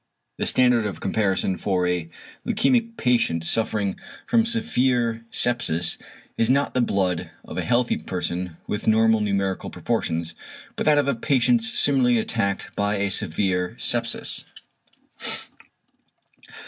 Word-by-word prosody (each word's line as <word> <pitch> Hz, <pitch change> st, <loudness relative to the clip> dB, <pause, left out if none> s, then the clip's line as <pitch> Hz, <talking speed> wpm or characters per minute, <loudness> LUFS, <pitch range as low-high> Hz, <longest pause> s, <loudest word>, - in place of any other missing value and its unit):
The -, -, 0 dB
standard 125 Hz, -4 st, +3 dB
of 95 Hz, -6 st, -6 dB
comparison 95 Hz, -2 st, 0 dB
for 95 Hz, -3 st, 0 dB
a 90 Hz, -2 st, -1 dB, 0.3 s
leukæmic 230 Hz, 0 st, +1 dB
patient 115 Hz, -10 st, +1 dB
suffering 105 Hz, +1 st, -1 dB, 0.3 s
from 230 Hz, -1 st, +2 dB
severe 125 Hz, -, 0 dB
sepsis 90 Hz, -11 st, 0 dB, 0.4 s
is 115 Hz, -, +3 dB
not 140 Hz, +2 st, +2 dB
the 125 Hz, -, +2 dB
blood 95 Hz, -6 st, 0 dB, 0.2 s
of -, -, -8 dB
a -, -, -1 dB
healthy 120 Hz, 0 st, +1 dB
person 90 Hz, -2 st, -3 dB
with 105 Hz, -, -4 dB
normal 110 Hz, 0 st, +4 dB
numerical 100 Hz, -2 st, -1 dB
proportions, 85 Hz, 0 st, -2 dB, 0.4 s
but -, -, -2 dB
that 150 Hz, -1 st, +5 dB
of 145 Hz, -2 st, +2 dB
a 140 Hz, -, +2 dB
patient 140 Hz, -, +2 dB
similarly 135 Hz, -, +3 dB
attacked 100 Hz, -3 st, -2 dB
by 100 Hz, +1 st, 0 dB
a 100 Hz, -1 st, 0 dB
severe 90 Hz, +3 st, 0 dB
sepsis. 115 Hz, -1 st, 0 dB
110 Hz, 125 wpm, -24 LUFS, 95-125 Hz, 0.4 s, that